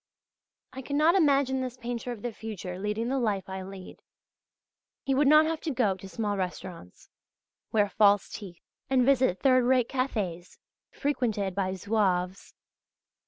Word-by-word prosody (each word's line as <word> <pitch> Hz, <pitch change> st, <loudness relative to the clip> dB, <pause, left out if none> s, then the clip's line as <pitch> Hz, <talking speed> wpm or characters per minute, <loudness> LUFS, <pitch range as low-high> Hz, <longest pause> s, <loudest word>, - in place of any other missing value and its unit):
I 265 Hz, -, -6 dB
cannot 295 Hz, +5 st, +2 dB
imagine 280 Hz, -7 st, +3 dB
this 255 Hz, -1 st, -5 dB
painter 245 Hz, 0 st, -5 dB
of 225 Hz, -4 st, -8 dB
the 240 Hz, -, -2 dB
future 195 Hz, -5 st, -7 dB
leading 210 Hz, +3 st, -2 dB
the 270 Hz, +1 st, 0 dB
life 205 Hz, -6 st, -1 dB
I 190 Hz, 0 st, -5 dB
lead. 190 Hz, 0 st, -10 dB, 1.0 s
He 270 Hz, -, 0 dB
would 275 Hz, +2 st, +3 dB
not 305 Hz, +2 st, +7 dB
have 320 Hz, 0 st, -2 dB
to -, -, -3 dB
go 240 Hz, -8 st, +1 dB
to 190 Hz, +1 st, -11 dB
small 205 Hz, -1 st, -2 dB
restaurants, 180 Hz, -, -7 dB, 0.6 s
wear 210 Hz, -2 st, +3 dB
false 205 Hz, -1 st, +3 dB
teeth 185 Hz, -5 st, -10 dB, 0.3 s
and 260 Hz, -2 st, +3 dB
visit 260 Hz, -8 st, +2 dB
third 255 Hz, -2 st, +4 dB
rate 250 Hz, -2 st, +3 dB
cafés 205 Hz, -10 st, -3 dB, 0.3 s
frequented 220 Hz, -9 st, -1 dB
by 190 Hz, 0 st, -1 dB
Zouaves. 190 Hz, -2 st, -1 dB
220 Hz, 150 wpm, -28 LUFS, 190-265 Hz, 1.0 s, not